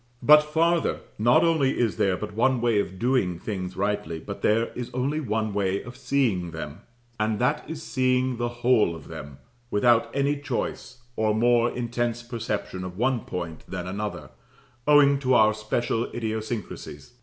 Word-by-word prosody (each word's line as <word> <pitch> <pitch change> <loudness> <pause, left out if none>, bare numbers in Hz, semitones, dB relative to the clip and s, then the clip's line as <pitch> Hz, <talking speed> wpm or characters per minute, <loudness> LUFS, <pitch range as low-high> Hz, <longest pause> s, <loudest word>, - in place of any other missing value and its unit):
But 150 0 +8
farther, 165 +2 +1 0.2
not 120 +3 +5
only 160 -5 +2
is 115 -7 0
there 95 -2 +2
but 105 - -6
one 125 +4 +2
way 115 -3 +2
of 95 -2 -3
doing 115 -7 +1
things 95 -1 -5
rightly, 95 -5 -1
but 100 +5 -8
there 115 +2 +2
is 125 -1 -5
only 140 +4 0
one 110 -6 -1
way 100 -1 0
of 120 0 -10
seeing 125 -9 0
them, 80 -2 -7 0.4
and 110 0 +1
that 125 +6 +1
is, 160 -1 -6
seeing 130 -1 +1
the 120 0 -1
whole 120 -7 +2
of 80 - -12
them, 70 0 -8 0.3
without 115 +2 +3
any 140 +1 +1
choice, 125 -3 -4
or 110 -1 +1
more 120 +1 +3
intense 120 -1 -2
perception 110 -5 -4
of 90 0 -7
one 125 +2 +1
point 85 -3 -5
than 90 -2 -5
another, 95 -7 -5 0.6
owing 145 -2 +6
to 130 -2 +2
our 110 -2 +5
special 115 +2 -1
idiosyncrasies. 110 - -5
115 Hz, 165 wpm, -25 LUFS, 100-130 Hz, 0.6 s, But